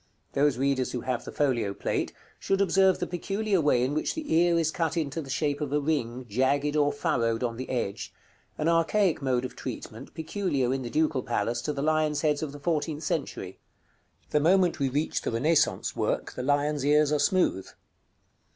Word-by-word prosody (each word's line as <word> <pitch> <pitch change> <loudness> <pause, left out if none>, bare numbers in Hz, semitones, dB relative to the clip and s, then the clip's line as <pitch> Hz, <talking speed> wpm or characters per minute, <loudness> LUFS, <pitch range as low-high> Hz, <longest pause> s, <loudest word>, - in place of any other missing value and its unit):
Those 140 -2 +2
readers 135 -1 0
who 125 - -2
have 125 -1 -3
the - - -6
folio 120 -9 0
plate, - - -2 0.3
should 195 0 0
observe 190 0 +4
the - - -2
peculiar 195 +2 -1
way 135 -5 +3
in 130 +3 0
which 155 - -1
the 310 - -3
ear 170 +1 +4
is 160 -1 +1
cut 165 -1 -1
into 155 0 -2
the 140 - -10
shape 145 +1 -1
of 145 -2 -2
a 150 - +2
ring, 130 -5 -2
jagged 140 +6 +1
or 145 -1 +3
furrowed 115 -5 0
on 115 -2 -1
the 130 +2 -6
edge; 120 -6 -3 0.5
an 155 - -1
archaic 170 +2 +2
mode 130 -2 0
of 125 - -7
treatment 120 0 -8
peculiar, 160 -6 -1
in 135 - -2
the 120 - -5
Ducal 155 -1 +1
Palace, 120 -1 -1
to 150 - -2
the 140 -1 -3
lions' 155 -1 +1
heads 150 -2 +1
of 155 -3 -3
the 145 - -10
fourteenth 155 0 -1
century. - - -3 0.7
The 150 - +3
moment 180 +3 +3
we 135 -1 +1
reach 145 +4 -1
the - - -2
Renaissance 150 +8 +1
work, - - -1
the - - -5
lions' 145 +1 +1
ears 150 +1 +4
are 150 - +2
smooth. 185 - +1
145 Hz, 195 wpm, -27 LUFS, 130-160 Hz, 0.7 s, observe